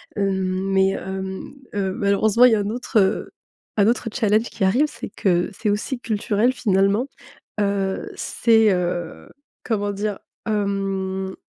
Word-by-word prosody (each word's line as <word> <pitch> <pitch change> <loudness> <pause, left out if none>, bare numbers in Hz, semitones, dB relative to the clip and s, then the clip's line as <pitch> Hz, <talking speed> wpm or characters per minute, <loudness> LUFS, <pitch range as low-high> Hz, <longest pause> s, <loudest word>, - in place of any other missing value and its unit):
Hem, 190 -1 -1
mais, 190 0 +4
hem, 190 +5 -5 0.2
hem, 195 -2 -1
malheureusement, 205 +4 +3
il 250 - +6
y - - +5
a - - 0
un 205 0 -1
autre, 235 0 0
heu, 195 +1 +1 0.5
un 205 0 +4
autre 235 0 +1
challenge 220 -2 +2
qui - - -4
arrive. 235 +11 +4
C'est - - -8
que 180 -3 +1
c'est 210 +2 -2
aussi 225 +5 -1
culturel 220 +1 +1
finalement, 200 +1 +2 0.5
heu, 200 -2 -1
c'est, 225 -2 +3
heu, 175 -2 -3 0.3
comment 205 -3 -1
dire? 205 0 -3 0.3
Hem, 195 -2 -2
200 Hz, 145 wpm, -22 LUFS, 190-220 Hz, 0.5 s, il